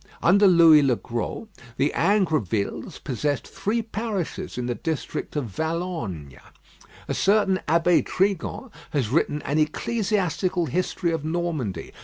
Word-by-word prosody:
Under 200 +4 +6
Lewis 165 -4 +7
le 130 -3 +3
Gros 120 - -4 0.3
the 145 +2 +1
Ingrovilles 155 - 0
possessed 145 +2 -2
three 225 +3 -2
parishes 215 - -4
in 125 - -2
the 120 - -1
district 160 +3 -4
of 145 -3 -1
Valognes. 120 - -4 0.7
A - - -1
certain 195 -1 +2
Abbé 170 +3 +3
Trigan 200 +6 -1 0.2
has 135 -8 0
written 150 +1 0
an 145 +3 0
Ecclesiastical 185 0 0
History 180 +1 -1
of 165 -3 -2
Normandy. 155 - -3
165 Hz, 125 wpm, -24 LUFS, 140-190 Hz, 0.7 s, Lewis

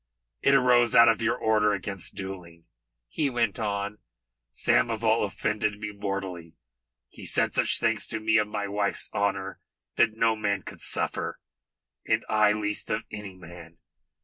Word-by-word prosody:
It 140 - +4
arose 125 -3 +4
out 115 0 +8
of 115 0 +1
your 115 0 +1
order 105 -1 +2
against 100 -2 -4
duelling," 90 -4 -8 0.4
he 145 - -1
went 115 -5 -1
on. 100 -1 -3 0.5
"Samoval 110 - +1
offended 105 +1 -2
me 105 0 -5
mortally. 95 -5 -5 0.5
He - - -13
said - - +3
such - - +3
things - - 0
to 115 - -4
me 110 +1 +2
of 105 -1 +2
my 105 -1 -3
wife's 100 0 -2
honour 100 -1 -2 0.4
that 110 -1 +3
no 115 0 +3
man 100 -3 -1
could - - -10
suffer, - - -2 0.6
and - - 0
I 105 -1 +4
least 105 0 -2
of 105 +1 -1
any 105 -3 -7
man. 85 -2 -13
105 Hz, 150 wpm, -26 LUFS, 100-110 Hz, 0.6 s, out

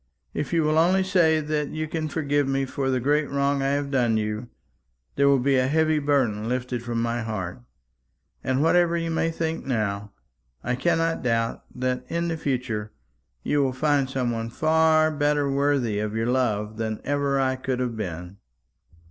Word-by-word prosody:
If 145 - -3
you 165 -2 +2
will 155 +1 +3
only 185 +3 +4
say 165 -4 +3
that 150 -1 -2
you 155 0 -3
can 155 0 -3
forgive 145 -2 0
me 135 0 0
for 135 0 -2
the 130 -1 +1
great 145 +3 +1
wrong 140 0 +1
I 135 - +1
have 140 -1 -2
done 120 -5 +2
you, 105 +2 -3 0.7
there 140 0 +3
will 140 0 +5
be 135 +1 +2
a 130 0 +2
heavy 155 +1 +2
burden 125 -7 +1
lifted 125 -1 -2
from 120 -1 -3
my 120 +1 -1
heart; 110 -2 -4 0.8
and 130 +2 +1
whatever 170 +1 +3
you 165 0 -2
may 165 0 +1
think 165 0 -3
now, 105 -5 -2 0.5
I 125 - -1
cannot 165 +4 +1
doubt 115 -1 -1
that 125 0 -1
in 170 0 -1
the 165 - -2
future 120 -8 -2 0.5
you 145 - +1
will 135 -2 +1
find 140 0 +1
some 130 -2 -1
one 115 0 -3
far 155 +3 +3
better 145 -1 +1
worthy 135 -6 +1
of 105 0 -3
your 115 0 0
love 110 -4 0
than 110 -1 -2
ever 140 -1 0
I 130 -1 +1
could 130 -1 -3
have 125 -2 -2
been." 90 -2 -6
135 Hz, 180 wpm, -25 LUFS, 120-155 Hz, 0.8 s, will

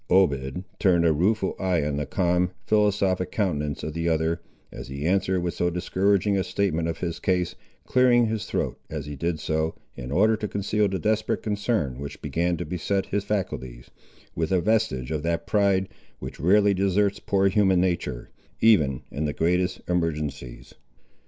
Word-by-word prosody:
Obed 80 -3 +2 0.2
turned 85 -4 +3
a 80 - +4
rueful 95 +5 +1
eye 90 -5 +1
on 75 -1 -1
the 75 -2 -2
calm, 90 +3 +1 0.2
philosophic 100 -4 +1
countenance 75 -8 -1
of 80 - -4
the 85 +1 -1
other, 80 +1 0 0.3
as - - -8
he 70 +3 -5
answered 95 0 +1
with 85 -1 -2
so 90 - 0
discouraging 95 +3 +1
a 95 - +1
statement 85 -6 -1
of 80 -1 -3
his 85 -2 -3
case, 90 -3 0 0.3
clearing 125 -2 +4
his 110 -2 -3
throat, - - -2
as 75 -2 -5
he 75 0 -6
did 85 +3 -2
so, 80 +1 -1 0.2
in 60 +2 -7
order 110 +8 +4
to 110 0 -4
conceal 105 +1 0
the 95 -1 -2
desperate 110 +5 0
concern 105 - -1
which 70 0 -7
began 85 +1 -1
to 85 - -4
beset 95 +2 -1
his 100 0 -2
faculties, 65 -12 -4 0.4
with 80 +1 -2
a 95 - +3
vestige 90 - 0
of 75 -2 -1
that 85 +1 -1
pride, 100 -2 +2 0.3
which - - -8
rarely 100 +6 +4
deserts 100 +1 +1
poor 100 0 +2
human 95 -2 +3
nature, 85 -9 -2 0.3
even 75 - +4
in 75 +2 -2
the 75 - -1
greatest 90 +3 0
emergencies. 75 -8 -3
90 Hz, 170 wpm, -25 LUFS, 80-100 Hz, 0.4 s, a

